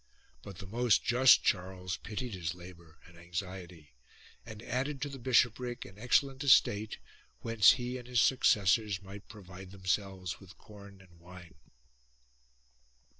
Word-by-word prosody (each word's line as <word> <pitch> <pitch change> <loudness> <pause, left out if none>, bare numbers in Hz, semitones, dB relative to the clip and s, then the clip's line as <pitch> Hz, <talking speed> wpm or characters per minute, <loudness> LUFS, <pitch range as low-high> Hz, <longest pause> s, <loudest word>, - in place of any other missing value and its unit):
But 95 +5 -11
the 95 - -9
most 115 +2 +1
just 125 +3 +5
Charles 90 -1 -2
pitied 115 +2 -6
his 85 -3 -4
labour 85 -2 -14
and 85 - -17
anxiety 85 -2 -8 0.5
and 110 -1 -11
added 135 +4 -3
to 145 - -4
the 135 -1 -9
bishopric 120 0 +1
an 100 +1 -14
excellent 135 +3 +1
estate 110 -6 +3 0.4
whence 115 -4 +5
he 125 0 -5
and 120 - -13
his 125 -1 +1
suc 130 +3 +3
cessors 100 0 +2
might 100 +1 -12
provide 95 -3 -12
themselves 95 -1 -3
with 95 -2 -16
corn 100 -2 -15
and 85 -3 -21
wine. 90 -1 -14
100 Hz, 140 wpm, -31 LUFS, 90-120 Hz, 0.5 s, just